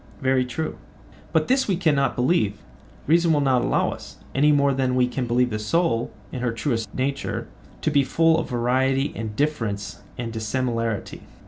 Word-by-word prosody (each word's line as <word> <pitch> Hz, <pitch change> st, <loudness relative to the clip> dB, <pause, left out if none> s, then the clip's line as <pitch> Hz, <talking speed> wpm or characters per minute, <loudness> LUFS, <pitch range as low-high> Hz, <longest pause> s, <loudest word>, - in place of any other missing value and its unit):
Very 130 Hz, -2 st, +2 dB
true. 155 Hz, +6 st, -4 dB, 0.5 s
But 160 Hz, -1 st, +2 dB
this 265 Hz, +1 st, +2 dB
we 195 Hz, -, +2 dB
cannot 150 Hz, -6 st, +2 dB
believe—reason 150 Hz, -, 0 dB
will 150 Hz, -, +3 dB
not 130 Hz, -3 st, +3 dB
allow -, -, +1 dB
us—any 145 Hz, +3 st, -1 dB
more 140 Hz, -1 st, +3 dB
than 130 Hz, -1 st, 0 dB
we 125 Hz, -1 st, +3 dB
can 125 Hz, 0 st, -3 dB
believe 125 Hz, +1 st, +2 dB
the 105 Hz, -, -2 dB
soul, 120 Hz, +1 st, +1 dB, 0.2 s
in 130 Hz, -, -4 dB
her 125 Hz, -2 st, 0 dB
truest 115 Hz, -3 st, -2 dB
nature, 140 Hz, +2 st, -2 dB, 0.4 s
to 155 Hz, -, +1 dB
be 140 Hz, -1 st, +4 dB
full 165 Hz, +3 st, +3 dB
of -, -, -4 dB
variety 130 Hz, +3 st, +1 dB
and 110 Hz, -1 st, -5 dB
difference 105 Hz, -, -2 dB, 0.2 s
and 115 Hz, -2 st, -4 dB
dissimilarity. 115 Hz, -1 st, -2 dB
130 Hz, 160 wpm, -24 LUFS, 115-150 Hz, 0.5 s, be